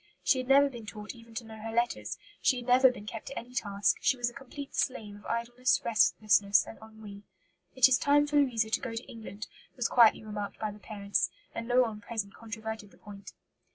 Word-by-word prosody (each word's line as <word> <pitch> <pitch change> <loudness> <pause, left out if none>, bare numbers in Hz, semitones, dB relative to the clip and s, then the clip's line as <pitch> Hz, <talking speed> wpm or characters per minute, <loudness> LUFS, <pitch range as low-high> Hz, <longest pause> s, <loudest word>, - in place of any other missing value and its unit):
She 265 - +3
had 255 - -4
never 280 +1 +6
been 240 -5 -9
taught 210 -1 -7
even 230 -1 -16
to 235 - -4
know 220 -1 -11
her 225 +1 -6
letters; 235 +1 -1 0.2
she 260 - +3
had 245 - -6
never 255 +1 +6
been 210 -4 -10
kept 220 0 -7
to 275 - -7
any 245 +2 -7
task; 200 -4 +1
she 260 - +2
was 240 -1 -1
a - - -20
complete 275 +2 -9
slave 215 -5 -2
of 205 - -17
idleness, 240 +2 +1
restlessness, 205 -3 +3
and - - -11
ennui. 220 -2 -11 0.5
'It 260 -1 +7
is 260 -1 +3
time 290 +1 +4
for 295 0 0
Louisa 230 -6 +2
to - - +1
go 255 -4 -5
to 230 - -4
England,' 215 -2 -8 0.3
was 245 -3 0
quietly 230 -3 +5
remarked 210 -1 -5
by 215 -1 -3
the 210 - -13
parents; 200 -2 -1 0.2
and 230 0 -5
no 250 +1 +4
one 215 -3 -5
present 205 -2 -4
controverted 220 -1 -7
the - - -21
point." 200 -1 -11
225 Hz, 220 wpm, -30 LUFS, 210-250 Hz, 0.5 s, It